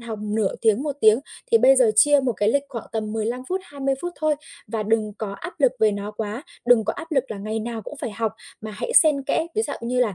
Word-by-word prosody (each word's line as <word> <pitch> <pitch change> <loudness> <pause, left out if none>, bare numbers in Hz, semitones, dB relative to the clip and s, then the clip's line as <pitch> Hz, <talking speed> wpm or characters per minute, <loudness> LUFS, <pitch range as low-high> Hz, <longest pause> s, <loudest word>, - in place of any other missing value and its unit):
học 230 -2 -6
nửa 210 -1 0
tiếng, 220 +2 +3
1 290 -2 -3
tiếng 220 +2 +6 0.3
thì 460 - +7
bây - - +6
giờ - - +5
chia 290 -1 +6
một 260 -2 0
cái 205 0 0
lịch 280 +4 +2
khoảng 235 -4 -7
tầm 215 -1 -3
15 225 +3 -2
phút, 375 +1 -1
20 275 -3 -2
phút 350 0 -3
thôi 310 -1 +1 0.3
và 220 0 -3
đừng 215 0 0
có 210 -3 -4
áp 340 - -9
lực 265 -2 +4
về 220 -1 +5
nó 205 +1 -4
quá, 215 +3 -5 0.2
đừng 240 -3 +5
có 220 - 0
áp 325 0 -8
lực 270 -2 +2
là 210 - -5
ngày 215 +2 -3
nào 225 0 -5
cũng 295 - -8
phải 240 - -3
học, 220 +1 -2 0.3
mà 215 - -6
hãy 470 - -4
xen 305 - +5
kẽ 320 +4 0
ví 440 - +1
dạo - - -4
như 250 +2 0
là 220 -6 +1
235 Hz, 265 wpm, -23 LUFS, 215-290 Hz, 0.3 s, thì